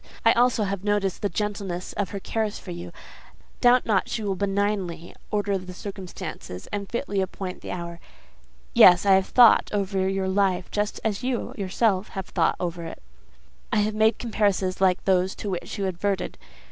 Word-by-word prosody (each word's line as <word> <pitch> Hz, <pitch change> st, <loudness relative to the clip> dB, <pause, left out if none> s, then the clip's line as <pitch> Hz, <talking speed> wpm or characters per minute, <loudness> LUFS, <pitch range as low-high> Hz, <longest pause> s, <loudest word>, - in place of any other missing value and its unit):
I 225 Hz, -, +8 dB
also 240 Hz, -2 st, +3 dB
have 200 Hz, -1 st, -3 dB
noticed 205 Hz, -3 st, 0 dB
the 205 Hz, -, 0 dB
gentleness 200 Hz, -2 st, -3 dB
of 205 Hz, -3 st, -2 dB
her 200 Hz, -, -5 dB
cares 215 Hz, +1 st, -2 dB
for 180 Hz, -, -9 dB
you: 175 Hz, 0 st, -7 dB, 0.7 s
doubt 245 Hz, 0 st, +5 dB
not 205 Hz, -4 st, +1 dB
she 220 Hz, -, -3 dB
will 200 Hz, -2 st, 0 dB
benignantly 195 Hz, -3 st, -2 dB, 0.2 s
order 205 Hz, -2 st, 0 dB
the 185 Hz, 0 st, -9 dB
circumstances, 185 Hz, -, -7 dB
and 200 Hz, -1 st, -4 dB
fitly 235 Hz, -5 st, -1 dB
appoint 190 Hz, 0 st, -5 dB
the -, -, -8 dB
hour. 170 Hz, -1 st, -5 dB, 0.7 s
Yes: 180 Hz, +1 st, +7 dB
I 195 Hz, -, +6 dB
have 190 Hz, 0 st, +3 dB
thought 245 Hz, -2 st, +6 dB
over 195 Hz, -2 st, 0 dB
your 195 Hz, 0 st, -1 dB
life 190 Hz, -1 st, +1 dB
just 210 Hz, 0 st, -1 dB
as 210 Hz, -2 st, -1 dB
you 255 Hz, -1 st, -2 dB
have -, -, -12 dB
yourself 195 Hz, 0 st, +1 dB
thought 185 Hz, -3 st, -1 dB
it -, -, -3 dB
over; 170 Hz, -1 st, -4 dB, 0.8 s
I -, -, +2 dB
have 215 Hz, +1 st, 0 dB
made 220 Hz, +1 st, +3 dB
comparisons 200 Hz, -5 st, 0 dB
like 185 Hz, -1 st, +2 dB
those 185 Hz, 0 st, +2 dB
to 205 Hz, -, -4 dB
which 180 Hz, +4 st, -4 dB
you 200 Hz, -, -1 dB
adverted. 190 Hz, +2 st, -2 dB
195 Hz, 175 wpm, -25 LUFS, 185-210 Hz, 0.8 s, I